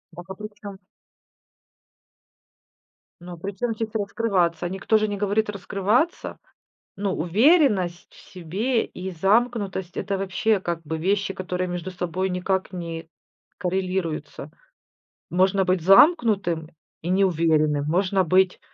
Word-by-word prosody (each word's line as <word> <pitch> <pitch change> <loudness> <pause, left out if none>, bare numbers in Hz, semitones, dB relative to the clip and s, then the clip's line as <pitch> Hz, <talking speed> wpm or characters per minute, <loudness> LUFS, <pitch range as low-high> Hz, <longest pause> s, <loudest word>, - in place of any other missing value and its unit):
Дак, 175 +2 -11
а - - -4
причём 205 -1 -9
с - - -43 2.4
ну, 175 -1 -9
причём 200 +6 -3
здесь 225 0 -4
"раскрываться?" 195 -6 0
Никто 195 +3 +1
же 215 0 +1
не 205 -1 -3
говорит 210 +1 0
"раскрываться". 205 - -1 0.6
Ну, 195 -1 -1
уверенность 195 - +2
в - - -20 0.2
себе 200 +8 -1
и 190 +1 -7
замкнутость- 195 0 0
это 195 0 -2
вообще, 195 +3 +1
как 170 -2 -3
бы 160 +1 -4
вещи, 195 +3 0
которые 180 0 -3
между 175 +1 -4
собой 180 +1 -2
никак 190 +1 -1
не 165 -2 -6 0.5
коррелируются. 185 -3 -3 0.8
Можно 190 +2 +2
быть 185 -2 +1
замкнутым 195 - +4 0.3
и 175 - -3
неуверенным, 160 -6 +2
можно 185 +3 +1
быть 185 +2 +2
190 Hz, 120 wpm, -24 LUFS, 175-205 Hz, 2.4 s, замкнутым